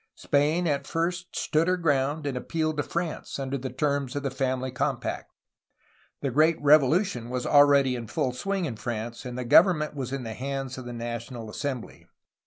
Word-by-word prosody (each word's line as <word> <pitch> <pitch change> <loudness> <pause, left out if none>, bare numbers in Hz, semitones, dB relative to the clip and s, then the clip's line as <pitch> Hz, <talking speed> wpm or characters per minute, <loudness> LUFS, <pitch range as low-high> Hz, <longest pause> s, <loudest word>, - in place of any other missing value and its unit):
Spain 150 +5 +1
at 145 -4 0
first 175 +2 -2
stood 160 +2 +1
her 185 0 +2
ground, 145 -2 0
and 140 -2 -2
appealed 155 +4 -1
to - - +2
France 170 +2 -4
under 135 0 -3
the 130 -1 -4
terms 140 0 -1
of 145 - -2
the 135 - -1
Family 130 -1 -1
Compact. 130 0 -2 0.9
The 140 - -1
great 155 +5 +3
Revolution 145 - +3
was 125 0 -3
already 140 -3 +5
in 115 -2 -6
full 125 +3 -1
swing 195 +7 -2
in 125 -8 -4
France, 115 +1 -5
and 125 0 -5
the 125 - -3
government 155 +3 +5
was 135 -3 -4
in 135 -2 -3
the 115 -1 -5
hands 135 +1 -4
of 130 - -9
the 120 - -6
National 120 -1 -6
Assembly. 130 -1 -5
140 Hz, 185 wpm, -27 LUFS, 125-155 Hz, 0.9 s, already